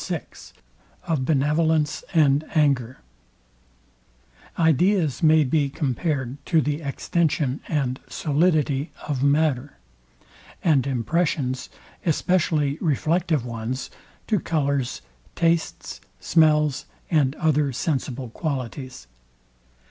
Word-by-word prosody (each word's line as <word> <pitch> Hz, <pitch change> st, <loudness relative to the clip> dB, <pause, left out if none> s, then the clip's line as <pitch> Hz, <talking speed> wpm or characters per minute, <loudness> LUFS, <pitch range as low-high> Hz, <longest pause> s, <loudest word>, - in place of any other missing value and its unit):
VI -, -, -2 dB, 0.8 s
OF 155 Hz, -7 st, -1 dB
BENEVOLENCE 150 Hz, +1 st, +1 dB
AND 150 Hz, -3 st, +3 dB
ANGER 135 Hz, -5 st, +1 dB, 1.6 s
Ideas 165 Hz, -1 st, +2 dB
may 155 Hz, -1 st, +5 dB
be 145 Hz, +1 st, +1 dB
compared 140 Hz, -2 st, -2 dB
to 165 Hz, -, +3 dB
the 150 Hz, +1 st, -1 dB
extension 145 Hz, -1 st, -1 dB
and 135 Hz, -4 st, -1 dB
solidity 150 Hz, -2 st, +1 dB, 0.2 s
of 140 Hz, -4 st, -2 dB
matter, 140 Hz, -1 st, +1 dB, 0.9 s
and 140 Hz, -6 st, +3 dB
impressions, 130 Hz, 0 st, -1 dB, 0.3 s
especially 155 Hz, -3 st, +1 dB
reflective 160 Hz, -2 st, +1 dB
ones, 120 Hz, +2 st, -4 dB, 0.3 s
to 215 Hz, -3 st, +1 dB
colours, 140 Hz, -6 st, -1 dB, 0.3 s
tastes, 165 Hz, -1 st, -1 dB, 0.2 s
smells 150 Hz, -3 st, +3 dB, 0.3 s
and 145 Hz, -4 st, +2 dB
other 150 Hz, -4 st, +1 dB
sensible 130 Hz, -2 st, -2 dB
qualities. 130 Hz, -, -5 dB
150 Hz, 85 wpm, -24 LUFS, 135-160 Hz, 1.6 s, may